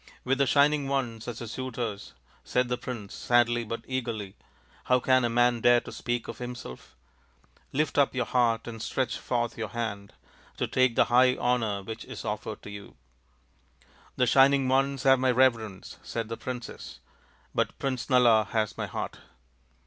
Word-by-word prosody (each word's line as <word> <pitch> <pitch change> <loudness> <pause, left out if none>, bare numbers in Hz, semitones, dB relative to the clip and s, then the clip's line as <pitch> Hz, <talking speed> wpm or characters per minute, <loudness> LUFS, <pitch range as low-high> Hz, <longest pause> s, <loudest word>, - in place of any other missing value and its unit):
" - - -29
With 135 +1 +1
the 140 - +3
Shining 145 +1 +3
Ones 125 -5 -2
as 120 -1 -5
your - - -4
suitors," 115 -3 -5 0.3
said 125 0 0
the 125 - 0
prince 120 -6 -6
sadly 120 -1 +2
but 115 +1 -6
eagerly, 115 -6 -4 0.2
" - - -30
how 125 0 +4
can 130 0 +3
a 120 - +1
man 120 0 +2
dare 120 +1 +6
to - - -10
speak 120 -1 -3
of - - -7
himself? 120 - -8 0.8
Lift 150 +1 0
up 140 -2 +3
your 125 -1 0
heart 115 -2 +1
and 115 -2 -7
stretch 130 0 -2
forth 120 -1 -2
your 110 - -2
hand 100 -2 -5 0.4
to - - 0
take 130 -2 +2
the - - +5
high 125 +1 +6
honour 115 -5 0
which 110 +3 -7
is - - -8
offered 105 0 -4
to 100 - -8
you." 100 0 -10 0.6
" - - -31
The 125 - +3
Shining 135 +2 +5
Ones 135 0 +1
have 135 -1 +5
my 130 0 +2
reverence," 115 -6 +1
said 115 -1 -4
the 115 - -3
princess, 125 -2 -7 0.3
" - - -34
but - - -1
Prince 130 -2 -3
Nala 120 -4 +5
has 110 -2 -1
my - - -2
heart." - - -5
120 Hz, 180 wpm, -28 LUFS, 115-130 Hz, 0.8 s, dare